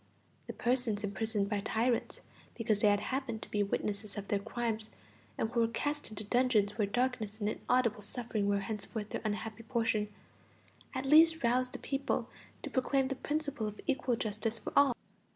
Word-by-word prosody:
The -, -, -4 dB
persons 240 Hz, -4 st, +1 dB
imprisoned 205 Hz, +1 st, -1 dB
by 205 Hz, 0 st, 0 dB
tyrants 230 Hz, +4 st, 0 dB, 0.3 s
because 220 Hz, -3 st, +1 dB
they 210 Hz, -, +4 dB
had 205 Hz, 0 st, +4 dB
happened 255 Hz, -3 st, -2 dB
to -, -, -9 dB
be 210 Hz, -, +1 dB
witnesses 205 Hz, +1 st, -2 dB
of 200 Hz, -1 st, -5 dB
their 205 Hz, -, +2 dB
crimes, 225 Hz, 0 st, -2 dB, 0.5 s
and 225 Hz, -, 0 dB
who 240 Hz, -, +1 dB
were 230 Hz, -, +4 dB
cast 290 Hz, +6 st, -2 dB
into 215 Hz, 0 st, -6 dB
dungeons 215 Hz, -3 st, +2 dB
where 210 Hz, -3 st, +1 dB
darkness 230 Hz, -2 st, -1 dB
and 205 Hz, -, 0 dB
inaudible 230 Hz, 0 st, +1 dB
suffering 215 Hz, -1 st, -2 dB
were 200 Hz, 0 st, +2 dB
henceforth 210 Hz, +1 st, -4 dB
their -, -, -3 dB
unhappy 215 Hz, 0 st, -3 dB
portion, 225 Hz, -3 st, 0 dB, 0.8 s
at 260 Hz, -, -2 dB
least 320 Hz, +2 st, +6 dB
roused 250 Hz, +2 st, +2 dB
the -, -, -3 dB
people 275 Hz, 0 st, -1 dB, 0.4 s
to -, -, -4 dB
proclaim 265 Hz, 0 st, +2 dB
the 270 Hz, -, -1 dB
principle 285 Hz, -5 st, -2 dB
of 210 Hz, 0 st, -7 dB
equal 255 Hz, -2 st, +1 dB
justice 220 Hz, +1 st, -2 dB
for -, -, -6 dB
all. 280 Hz, -4 st, +6 dB
225 Hz, 175 wpm, -33 LUFS, 210-255 Hz, 0.8 s, least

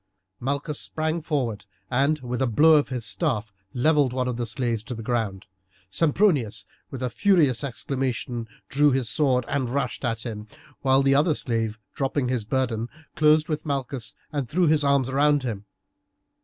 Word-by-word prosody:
Malchus 140 Hz, +3 st, -2 dB
sprang 160 Hz, +1 st, -2 dB
forward 135 Hz, -9 st, -2 dB, 0.2 s
and 140 Hz, +5 st, +2 dB
with 125 Hz, 0 st, -3 dB
a 130 Hz, -, +2 dB
blow 150 Hz, +8 st, +5 dB
of 150 Hz, -2 st, +4 dB
his 125 Hz, -4 st, -3 dB
staff 110 Hz, -, -1 dB, 0.2 s
levelled 140 Hz, +1 st, +2 dB
one 130 Hz, -1 st, -1 dB
of 125 Hz, -, -1 dB
the 120 Hz, 0 st, -3 dB
slaves 115 Hz, 0 st, -1 dB
to 125 Hz, +3 st, -6 dB
the 115 Hz, -, -7 dB
ground; 110 Hz, -5 st, -2 dB, 0.5 s
Sempronius 150 Hz, -, +2 dB, 0.2 s
with 130 Hz, -2 st, -6 dB
a 125 Hz, -, 0 dB
furious 150 Hz, -, +3 dB
exclamation 125 Hz, -3 st, -3 dB, 0.2 s
drew 145 Hz, +2 st, +3 dB
his 130 Hz, -3 st, 0 dB
sword 125 Hz, +2 st, +2 dB
and 135 Hz, -4 st, -1 dB
rushed 140 Hz, +2 st, -2 dB
at 115 Hz, -2 st, -1 dB
him, 105 Hz, -2 st, -6 dB, 0.3 s
while 135 Hz, 0 st, +4 dB
the 135 Hz, 0 st, +4 dB
other 150 Hz, +3 st, +3 dB
slave, 115 Hz, -4 st, -1 dB, 0.2 s
dropping 135 Hz, -1 st, -1 dB
his 125 Hz, -4 st, -1 dB
burden, 120 Hz, -1 st, -1 dB, 0.3 s
closed 155 Hz, 0 st, +4 dB
with 155 Hz, -1 st, -2 dB
Malchus 135 Hz, -5 st, -4 dB, 0.2 s
and 140 Hz, -6 st, -3 dB
threw 175 Hz, +5 st, +2 dB
his 155 Hz, -1 st, +3 dB
arms 140 Hz, -2 st, +3 dB
around 145 Hz, +1 st, +3 dB
him. 105 Hz, -5 st, -4 dB
130 Hz, 170 wpm, -25 LUFS, 120-145 Hz, 0.5 s, blow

